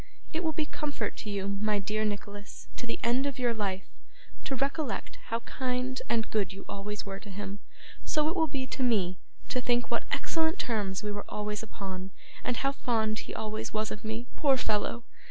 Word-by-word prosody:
It 325 +2 0
will 320 - +3
be 310 0 +1
comfort 295 -1 -1
to 215 - -4
you, 200 -1 0
my 215 -1 +3
dear 215 +2 +1
Nicholas, 205 -1 -3
to 245 - -3
the 230 - -1
end 250 +4 +4
of 275 - -2
your 245 -2 +3
life, 195 -3 -1 0.6
to 270 - +1
recollect 280 - 0
how 230 - 0
kind 255 +1 0
and 225 -2 +3
good 200 -4 +2
you 195 0 -8
always 205 +1 -3
were 195 0 -4
to 205 - -10
him 200 +1 -4 0.4
so 305 -1 +3
it 325 - +1
will 325 -3 +4
be 270 -3 -1
to 260 - -3
me, 195 -8 +3 0.3
to 255 - +2
think 245 0 +2
what - - +2
excellent 325 +2 +2
terms 205 -4 0
we 210 - 0
were 205 0 -3
always 210 0 -1
upon, 190 -3 -4 0.3
and 245 - +1
how 275 - +3
fond 220 -5 +2
he - - -5
always 215 0 -2
was 215 0 +1
of 210 - -4
me, 220 +2 -2
poor 275 -3 +5
fellow! 225 0 +1
220 Hz, 200 wpm, -31 LUFS, 205-260 Hz, 0.6 s, poor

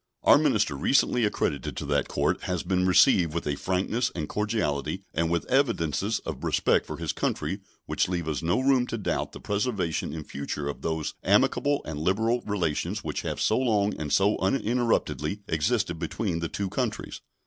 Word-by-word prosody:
Our - - +7
minister - - +2
recently 125 - +2
accredited 75 -8 -2
to - - -3
that 70 0 +1
Court - - 0
has 90 -3 -2
been 90 -1 +1
received 90 -2 +5
with 85 - -2
a 75 - 0
frankness 95 - -1
and 80 -4 -3
cordiality 105 - -1
and 80 +1 0
with 85 0 0
evidences 115 - +1
of - - -5
respect - - +2
for - - -5
his - - -2
country 95 - -2 0.3
which - - 0
leave 85 -3 -2
us 80 0 -2
no 85 +7 +1
room 130 -2 +3
to 115 - -3
doubt 105 - -2
the - - -10
preservation 100 - -1
in 80 0 -5
future 70 +1 -5
of 70 - -5
those 80 -2 -2
amicable 145 0 +2
and 75 -1 -5
liberal 110 +9 +1
relations 90 -8 -1
which - - -3
have - - -4
so 110 - +2
long 105 -5 +2
and 75 -2 -3
so 100 +2 +3
uninterruptedly 110 - 0
existed 80 +1 0
between 85 +1 -2
the 85 -1 -3
two 100 - -3
countries. - - -3
95 Hz, 180 wpm, -27 LUFS, 80-110 Hz, 0.3 s, Our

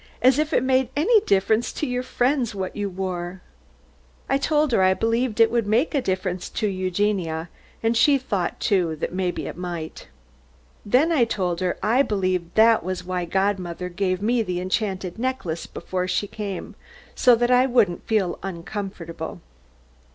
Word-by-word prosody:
As 260 +3 +4
if 305 +1 0
it 260 - +2
made 260 -1 +2
any 415 +9 +4
difference 205 +4 +2
to - - -2
your 250 -2 -1
friends 250 -2 0
what 190 -1 -4
you 205 -1 -2
wore." 185 -1 -5 0.8
I 275 - +1
told 300 0 +1
her 210 - +3
I 185 0 +4
believed 230 +2 0
it 225 - +6
would 235 -3 0
make 235 +11 +2
a 280 - +2
difference 185 -3 -2
to 215 - -1
Eugenia, 185 -3 -1 0.3
and 225 +1 +2
she 280 +5 +5
thought, 205 -9 -2
too, 175 -5 +1
that 155 - -4
maybe 180 -1 -2
it - - -6
might. 175 -3 -6 0.8
Then 260 +10 +3
I 295 -7 +4
told 180 -6 -2
her 185 -1 -1
I 235 +5 +4
believed 185 -7 -1
that 225 -2 +5
was 185 0 -4
why 180 -1 -2
godmother 185 -1 -1
gave 185 +1 -1
me 235 +2 +2
the 180 -5 -2
enchanted 185 0 -2
necklace 200 -10 -3
before 185 -1 -4
she 195 - 0
came, 200 -2 -6 0.4
so 250 -1 +5
that 240 +1 +1
I 250 +1 +5
wouldn't 225 -9 +1
feel 200 -6 0
uncomfortable. 175 -3 -6
200 Hz, 165 wpm, -23 LUFS, 180-240 Hz, 0.8 s, it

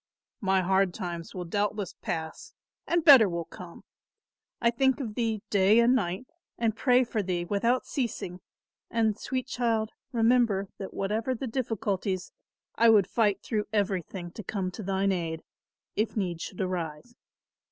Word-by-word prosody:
"My 190 -2 +2
hard 190 0 +2
times 175 -4 -5
will 180 -1 -4
doubtless 205 +2 -1
pass 160 -6 -5 0.3
and 340 -1 +1
better 260 - +9
will 170 -1 -3
come. 175 0 -11 0.8
I 235 0 +3
think 265 +3 +2
of 235 -6 -4
thee 220 -2 -1
day 200 +2 +5
and 235 +1 +5
night 190 -2 -1 0.3
and 225 -2 0
pray 250 +1 +4
for 230 -3 -2
thee 180 -2 -2
without 230 +7 +1
ceasing; 215 -8 -3 0.5
and 220 -2 +1
sweet 255 +3 -3
child, 230 -4 0 0.2
remember 230 -5 +2
that 195 - -7
whatever 220 +6 -1
the 255 - -4
difficulties, 205 -6 -2 0.4
I 230 0 +5
would 210 -4 +6
fight 205 -1 +1
through 210 -2 -1
everything 190 -4 -2
to 215 - -8
come 190 -3 -3
to 215 - -8
thine 195 0 0
aid 165 -3 -3 0.5
if 215 +1 -1
need 175 -5 -2
should 185 - -5
arise. 180 +2 -4
205 Hz, 150 wpm, -28 LUFS, 185-230 Hz, 0.8 s, better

